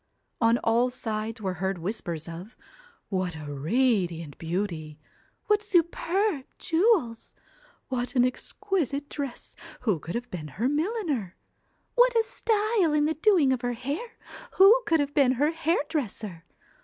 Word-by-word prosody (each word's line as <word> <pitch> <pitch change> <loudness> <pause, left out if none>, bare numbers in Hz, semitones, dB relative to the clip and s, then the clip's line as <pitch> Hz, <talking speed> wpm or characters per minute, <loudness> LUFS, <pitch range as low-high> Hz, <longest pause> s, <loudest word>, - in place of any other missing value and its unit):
On 230 +1 +4
all 235 +2 +3
sides 220 -2 -4
were 190 -2 -1
heard 190 0 0
whispers 170 -3 -4
of, 175 +7 -9 0.5
'What 185 -3 -1
a 150 -2 -7
radiant 170 - 0
beauty! 165 -3 -3 0.5
what 420 -1 +3
superb 360 -3 +1
jewels! 325 - +1 0.5
what 250 0 -3
an 245 -1 +5
exquisite 290 - -2
dress 280 -4 -5 0.3
who 210 -9 +1
could 165 +3 -6
have 245 +1 -4
been 160 -4 -5
her 235 +5 +1
milliner? 300 - -1 0.6
What - - +4
a 455 - +4
style 430 -6 +1
in 300 0 +3
the 315 - +1
doing 320 -5 +4
of 250 - -2
her 245 -1 -1
hair 285 - -4 0.4
who 410 +6 +7
could 325 -1 +3
have 285 0 -1
been 270 -4 +4
her 290 +5 +2
hairdresser? 285 - -2
255 Hz, 140 wpm, -27 LUFS, -, 0.6 s, who